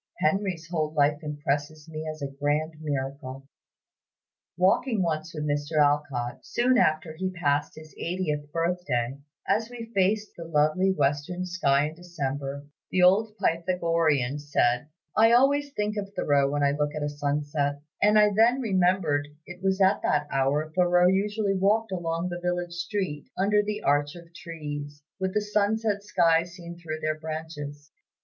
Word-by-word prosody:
Henry's 180 0 0
whole 155 -3 -1
life 145 0 +3
impresses 150 0 -3
me 155 0 -6
as 155 -1 -6
a 140 - -4
grand 150 +2 0
miracle." 135 -2 -4 1.1
Walking 190 +4 +2
once 160 -1 -2
with 150 -2 -5
Mr. 145 +1 -1
Alcott, 145 -4 +1
soon 250 +1 +2
after 155 -4 +1
he 185 +3 -2
passed 145 -6 0
his 155 -2 -12
eightieth 150 -5 -2
birth 170 +3 -1
day, 120 +2 -1 0.3
as 225 +1 +1
we 230 -2 -9
faced 205 +2 +1
the 170 - -7
lovely 160 +4 +2
western 150 +3 -1
sky 150 -6 +2
in - - -11
December, 145 -5 -5 0.2
the 185 - +2
old 210 +4 +4
Pythagorean 165 - +1
said, 140 -3 +1 0.3
"I 225 +2 +6
always 285 +3 +3
think 210 -4 -2
of 200 -1 -4
Thoreau 140 -1 +2
when 145 0 0
I 140 - +4
look 150 +1 -1
at 155 - -3
a - - 0
sunset;" 145 0 -1 0.2
and 210 +1 +5
I 210 -1 +6
then 230 +5 +4
remembered 180 - +1 0.2
it 175 0 -10
was 190 0 +1
at 195 +1 +4
that 150 0 +1
hour 140 +3 +1
Thoreau 180 0 +4
usually 205 +1 +1
walked 205 +3 +1
along 170 -1 -2
the 175 0 -5
village 175 0 -2
street, 175 -4 -3
under 205 +2 +3
the 210 0 -4
arch 145 +2 +1
of 170 -1 -13
trees, 145 -3 -7 0.2
with 190 -1 -2
the 210 - +3
sunset 210 0 0
sky 170 -5 +3
seen 170 0 -10
through 155 -2 -5
their 155 0 -1
branches. 155 -2 -7
165 Hz, 160 wpm, -27 LUFS, 145-190 Hz, 1.1 s, I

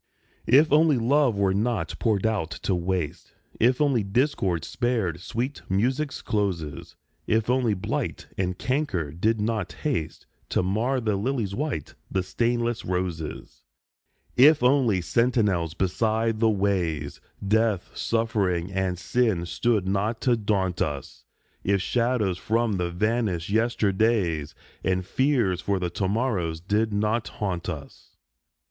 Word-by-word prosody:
If 145 +5 +5
only 155 -2 +5
love 125 -1 +2
were 100 -1 +2
not 100 -5 -1
poured 110 -4 +1
out 105 -7 0
to 95 - +1
waste, 90 -3 -2 0.3
If 125 +3 +3
only 140 -6 +3
discord 100 - 0
spared 115 -9 -1
sweet 125 +8 -3
music's 130 +9 0
closes, 85 -9 -2 0.3
If 110 +2 +2
only 125 -5 +2
blight 90 - -3
and 90 -1 -2
canker 130 - -1
did 110 +8 0
not 105 -3 -1
haste 125 - -2 0.2
To - - +1
mar 115 +8 0
the 110 -3 0
lily's 110 -1 -1
white, 140 - -3 0.2
the 95 - 0
stainless 120 +4 -1
roses! 80 -9 -4 0.7
If 145 +1 +6
only 125 -7 +3
sentinels 100 -7 +1
beside 110 +4 0
the 115 0 +4
ways, 95 -6 -1 0.3
Death, 110 -3 +1
suffering, 100 -6 0
and 95 -1 -1
sin 110 -4 +1
stood 105 +1 0
not 105 +4 0
to 125 -2 +3
daunt 100 -5 -1
us, 70 -3 -4 0.4
If 100 0 +2
shadows 115 -4 0
from 115 -1 0
the 90 -1 -1
vanished 100 -1 -1
yesterdays 105 -7 +1 0.3
And 95 -1 0
fears 120 -7 +1
for 100 0 0
the 90 -2 -2
to 95 - -1
morrows 95 -7 -1
did 105 +5 0
not 105 +1 0
haunt 90 -5 -3
us. 75 -5 -9
105 Hz, 130 wpm, -25 LUFS, 90-120 Hz, 0.7 s, If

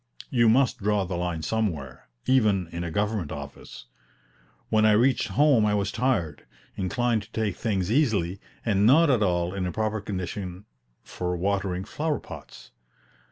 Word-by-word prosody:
You 120 -3 +4
must 125 +2 +3
draw 105 -1 +1
the 90 0 -4
line 85 -2 -2
somewhere, 80 - -3 0.2
even 105 -9 +3
in 85 0 -5
a 85 - -3
government 105 -2 -1
office. 70 -4 -9 0.8
When 110 0 +3
I 110 -1 +5
reached 125 +5 +3
home 145 -6 +4
I 105 -1 +2
was 100 0 -1
tired, 95 - -1 0.3
inclined 115 +4 0
to 100 - -15
take 110 -4 -1
things 100 -4 -1
easily, 100 - +1 0.3
and 105 -2 +3
not 150 +4 +6
at 120 -4 +2
all 90 -2 +1
in 95 -2 -2
a - - -2
proper 110 0 -1
condition 95 -1 -5 0.4
for 90 0 -3
watering 95 0 -1
flower 155 -1 -2
pots. - - -12
100 Hz, 160 wpm, -26 LUFS, 90-110 Hz, 0.8 s, not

